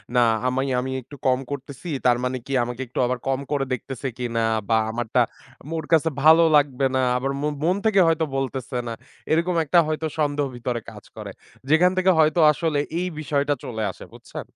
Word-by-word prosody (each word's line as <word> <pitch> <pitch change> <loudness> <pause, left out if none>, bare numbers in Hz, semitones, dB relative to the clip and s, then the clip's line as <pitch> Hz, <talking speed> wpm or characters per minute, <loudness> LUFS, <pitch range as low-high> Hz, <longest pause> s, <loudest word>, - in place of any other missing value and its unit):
না, 120 - +5 0.2
আমে 130 +1 0 0.2
আমি 130 +1 -3
একটু 145 +4 -13
কম 130 0 +3
করতেসি 140 +4 -7 0.2
তার 120 -1 +5
মানে 130 0 -1
কি 135 - -5
আমাকে 125 +2 -5
একটু 125 - -5
আবার 125 0 -1
কম 135 0 +1
করে 140 -2 0
দেখতেসে 135 +2 -4
কিনা? 115 -2 -1 0.3
বা 110 - +4
আমার 120 0 -3
টা - - +6 0.4
আম 150 - -11
ওর 155 - -6
কাছে 160 0 +4
ভালো 160 +2 +7
লাগবে 140 -2 +2
না, 130 - +2 0.2
আবার 135 +2 -2
মন, 150 0 -1
মন 180 +3 +2
থেকে 205 -3 +4
হয়তো 160 -1 +2
বলতেসে 130 -1 -3
না। 115 - -3 0.4
এরকম 170 +2 +2
একটা 170 +4 +4
হয়তো 155 0 -2
সন্দেহ 145 -1 +1
ভিতরে 120 0 -3
কাজ - - -12
করে। - - -7 0.4
যেখান 175 +4 +5
থেকে 185 0 +4
হয়তো 155 +2 +3
আসলে 155 -1 -1 0.2
এই 180 - -1
বিষয়টা 145 -1 0
চলে 110 -3 -4
আসে, - - -12
বুঝছেন? - - -9
140 Hz, 200 wpm, -23 LUFS, 125-155 Hz, 0.4 s, ভালো